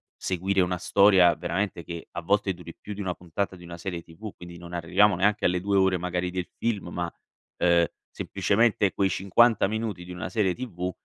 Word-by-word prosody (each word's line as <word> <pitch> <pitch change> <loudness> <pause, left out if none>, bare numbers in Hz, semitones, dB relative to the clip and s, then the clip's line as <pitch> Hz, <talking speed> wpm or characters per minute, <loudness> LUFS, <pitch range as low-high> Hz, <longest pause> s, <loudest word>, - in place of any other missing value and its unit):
seguire 95 +1 0
una 90 0 0
storia 95 -2 +5
veramente 90 0 -2
che 85 -1 -7
a 85 - -5
volte 100 +2 +1
duri 85 -2 -11
più 105 - -8
di - - -10
1 95 -2 -2
puntata 90 +3 -4
di 90 - -14
una 85 0 -9
serie 85 -1 -5
TV, 95 +6 -10
quindi 85 -1 -11
non 85 0 -11
arriviamo 90 +4 +3
neanche 105 +4 +1
alle 90 0 +2
2 100 0 +1
ore 95 -1 +3
magari 90 0 -2
del 90 -1 -3
film, 105 -6 -2
ma, 85 0 -4 0.4
ehm, 85 -1 +4 0.2
semplicemente 105 -2 +1
quei 95 -1 +1
50 105 +4 +3
minuti 110 -3 -3
di 90 - -10
una 90 - -5
serie 105 -5 +1
TV, 90 -8 -4
90 Hz, 195 wpm, -26 LUFS, 85-100 Hz, 0.4 s, storia